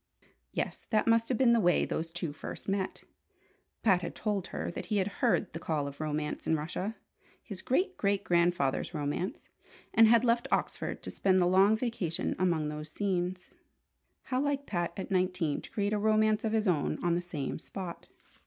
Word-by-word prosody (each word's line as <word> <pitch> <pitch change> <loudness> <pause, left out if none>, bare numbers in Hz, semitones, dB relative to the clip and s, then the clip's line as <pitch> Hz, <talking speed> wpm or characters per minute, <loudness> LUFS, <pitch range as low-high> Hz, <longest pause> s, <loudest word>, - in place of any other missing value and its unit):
Yes, - - -3
that 215 -2 +2
must 230 0 +3
have 255 - +1
been 240 -1 +5
the 235 - +4
way 175 -4 +3
those 165 +1 -3
two 170 -3 -4
first - - -8
met! 195 -1 -2 0.8
Pat 190 -5 +4
had 170 - -5
told 205 -4 -2
her - - -4
that - - -6
he 210 - 0
had 190 - +2 0.2
heard 235 -6 +2
the 165 - -4
call 155 -3 -1
of 140 +2 -8
romance 150 0 -3
in 160 - +3
Russia 175 +8 -3 0.5
his 200 -5 -8
great 370 +9 0
great 200 -1 +1
grandfather's 170 -6 +1
romance 175 - -3 0.4
and 225 0 +7
had 235 +2 +5
left 235 0 +2
Oxford - - -1
to - - -5
spend 190 -1 +2
the 180 - +4
long 190 +4 +5
vacation 220 -9 -1
among 170 -4 +1
those 150 0 -6
scenes. 180 -1 -2 0.7
How 255 0 -1
like 285 -1 -1
Pat 175 -6 -1
at 195 - -5
nineteen 180 -5 +1
to - - -11
create 205 0 -1
a 210 - +1
romance 215 0 +3
of 220 -1 0
his 220 -1 +1
own 160 -6 +1
on 175 -1 +2
the 175 - +1
same 155 -7 -4
spot! 180 +1 -7
185 Hz, 190 wpm, -30 LUFS, 170-220 Hz, 0.8 s, and